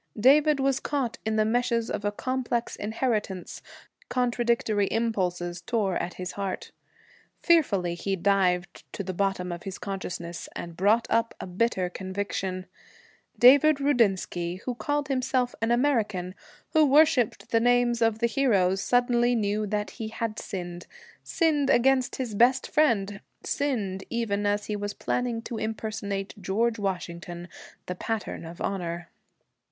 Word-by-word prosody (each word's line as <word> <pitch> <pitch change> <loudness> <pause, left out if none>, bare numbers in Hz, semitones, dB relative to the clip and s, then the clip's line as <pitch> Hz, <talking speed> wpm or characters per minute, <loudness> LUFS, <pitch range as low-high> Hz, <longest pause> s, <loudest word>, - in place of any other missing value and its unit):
David 290 +5 +5
was 270 -1 +2
caught 270 -5 -2
in 220 - +1
the 215 0 +3
meshes 235 0 0
of - - -3
a 205 - 0
complex 245 +1 -2
inheritance; 210 -4 -2 0.5
contradictory 235 -4 +1
impulses 180 -6 -1
tore 200 -1 0
at 175 - -4
his 180 -1 -5
heart. 195 -2 -4 0.7
Fearfully 205 - +3
he 195 +3 -2
dived 180 -2 +1
to 200 - -4
the 185 0 -4
bottom 195 -1 -1
of 175 0 -5
his 195 +1 -6
consciousness, 180 -3 -5
and 170 -1 -6
brought 210 +6 +3
up 230 0 +1
a - - -5
bitter 190 0 0
conviction: 190 0 -4 0.7
David 280 +4 +7
Rudinsky, 195 -9 +1
who 250 - -2
called 290 +3 -2
himself 255 -2 0
an 225 - +1
American, 220 -8 +1 0.4
who 315 -1 +6
worshiped 275 -5 +3
the 230 - +4
names 245 0 +3
of 225 -1 +3
the 235 - +1
heroes, 200 -7 +2
suddenly 245 0 +2
knew 210 -1 0
that 210 0 -2
he 220 - -6
had 220 0 -4
sinned, 175 -2 -6 0.4
sinned 300 -5 +1
against 260 0 +3
his 250 -5 -4
best 245 +5 +4
friend, 205 -10 +1 0.2
sinned 210 -10 -1
even 205 -3 -1
as 205 0 0
he 210 - -3
was 205 0 -4
planning 240 -2 -2
to 230 -2 -5
impersonate 215 -3 -3
George 225 +5 0
Washington, 175 -2 -4 0.4
the 180 - -3
pattern 215 -1 -4
of 170 +2 -9
honor. 175 -3 -3
215 Hz, 140 wpm, -27 LUFS, 190-245 Hz, 0.7 s, David